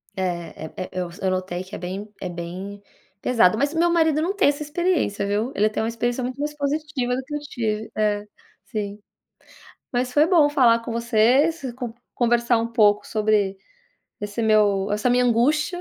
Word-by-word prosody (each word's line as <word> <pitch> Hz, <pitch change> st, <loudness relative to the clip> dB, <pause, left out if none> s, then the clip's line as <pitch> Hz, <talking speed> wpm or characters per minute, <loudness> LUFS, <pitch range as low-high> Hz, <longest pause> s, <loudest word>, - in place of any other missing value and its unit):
É, 190 Hz, -, -3 dB, 0.6 s
é -, -, -2 dB
é -, -, -9 dB
eu 180 Hz, -2 st, -3 dB
s 170 Hz, -, -13 dB
eu 190 Hz, -, +2 dB
notei 185 Hz, -1 st, -3 dB
que 185 Hz, -, -9 dB
é -, -, -5 dB
bem 190 Hz, +4 st, -5 dB
é 180 Hz, -, -3 dB
bem 180 Hz, +4 st, -7 dB, 0.4 s
pesado. 220 Hz, -5 st, +3 dB
Mas 285 Hz, +5 st, 0 dB
o 325 Hz, -, -1 dB
meu 345 Hz, 0 st, +4 dB
marido 320 Hz, -3 st, +3 dB
não 380 Hz, +5 st, -1 dB
tem 395 Hz, -7 st, +4 dB
essa 290 Hz, +1 st, -2 dB
experiência, 295 Hz, -, 0 dB
viu. 210 Hz, +6 st, -1 dB
Ele 215 Hz, +1 st, +3 dB
tem 215 Hz, -, -2 dB
uma 225 Hz, -, -1 dB
experiência 240 Hz, +2 st, -2 dB
muito 255 Hz, +2 st, -4 dB
mais 295 Hz, +1 st, -2 dB
positiva 285 Hz, -3 st, -1 dB
do 260 Hz, -, -4 dB
que 295 Hz, +3 st, -10 dB
eu -, -, -2 dB
tive 225 Hz, -6 st, -3 dB
é, 210 Hz, -1 st, +1 dB, 0.4 s
sim. 210 Hz, -2 st, -4 dB, 0.9 s
Mas 250 Hz, 0 st, -1 dB
foi 295 Hz, +3 st, +4 dB
bom 320 Hz, -6 st, +5 dB
falar 240 Hz, -5 st, +4 dB
com 230 Hz, -, -7 dB
você, 235 Hz, 0 st, -3 dB, 0.3 s
s 280 Hz, -7 st, -4 dB
con 245 Hz, -3 st, -6 dB, 0.2 s
conversar 235 Hz, 0 st, +2 dB
um 230 Hz, +1 st, -1 dB
pouco 210 Hz, -3 st, +3 dB
sobre 210 Hz, -3 st, +1 dB, 0.6 s
esse 205 Hz, +2 st, -3 dB
meu 205 Hz, -2 st, +3 dB
essa 210 Hz, +4 st, +1 dB
minha 250 Hz, 0 st, +3 dB
angústia, 300 Hz, +9 st, +2 dB
230 Hz, 195 wpm, -23 LUFS, 205-285 Hz, 0.9 s, bom